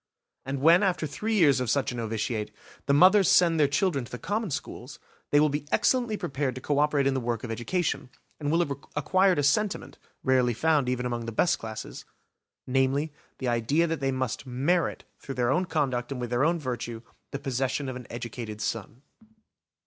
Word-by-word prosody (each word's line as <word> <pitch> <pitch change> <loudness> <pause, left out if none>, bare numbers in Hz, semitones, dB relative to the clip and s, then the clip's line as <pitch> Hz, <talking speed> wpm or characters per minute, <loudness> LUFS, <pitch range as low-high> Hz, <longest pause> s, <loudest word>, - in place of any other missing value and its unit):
And 135 0 -3
when 165 +5 +6
after 180 -5 +1
three 210 +10 -2
years 145 -9 +5
of 125 -2 -2
such 135 +2 +1
a - - -6
novitiate, 110 -1 -2 0.4
the 140 - +3
mothers 185 +4 +6
send 170 -2 +4
their 145 - +5
children 145 -1 0
to 120 - -12
the 125 - -5
common 210 - -2
schools, 140 - -6 0.3
they 145 - +4
will 155 - +5
be 145 0 -3
excellently 240 -4 +2
prepared 135 -5 -2
to - - -5
co 145 +2 0
operate 150 -2 +2
in 135 - +2
the 135 - 0
work 120 -2 -3
of 120 - -4
education, 130 +4 -2 0.3
and 145 -1 -1
will 165 +2 +3
have 145 - -1 0.2
acquired 185 +5 +3
a 145 - +1
sentiment, 200 +9 0 0.2
rarely 125 -2 +2
found 150 -1 +2
even 125 0 -1
among 120 -1 -3
the - - -3
best 165 +10 +2
classes; 110 -1 -7 0.6
namely, 135 +4 +1 0.2
the 130 - -4
idea 120 +8 +2
that 165 -1 -2
they 135 -1 0
must 130 0 -3
merit 145 +8 0 0.2
through 135 - -7
their 120 0 +1
own 180 +7 +1
conduct 135 -7 -1
and 135 - -4
with 120 -1 -4
their 120 +2 +2
own 170 +3 +3
virtue, 120 -4 -5 0.3
the - - -4
possession 135 +1 -2
of 130 - -4
an 125 -1 -9
educated 115 -2 -6
son. 115 +4 -4
135 Hz, 200 wpm, -27 LUFS, 125-160 Hz, 0.6 s, when